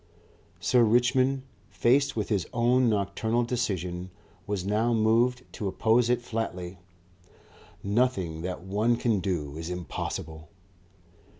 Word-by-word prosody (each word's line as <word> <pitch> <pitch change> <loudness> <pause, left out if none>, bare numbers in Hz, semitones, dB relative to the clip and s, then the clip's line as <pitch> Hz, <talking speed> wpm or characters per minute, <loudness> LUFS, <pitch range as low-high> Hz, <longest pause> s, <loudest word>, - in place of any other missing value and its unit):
Sir 125 -2 +3
Richmond, 130 +4 +3 0.3
faced 135 +4 +2
with 105 -2 -2
his 100 -5 0
own 120 +1 +3
nocturnal 110 +3 0
decision, 95 -7 -2 0.4
was 100 -3 -2
now 110 +4 +1
moved 115 +3 +2
to 105 - -4
oppose 115 +5 +2
it 120 0 +1
flatly. 95 -6 -4 1.0
"Nothing 100 -7 0
that 90 0 -5
one 105 +5 +1
can 115 -3 +1
do 85 -6 -3
is 80 +1 -5
impossible." 80 -2 -5
110 Hz, 115 wpm, -27 LUFS, 90-120 Hz, 1.0 s, Sir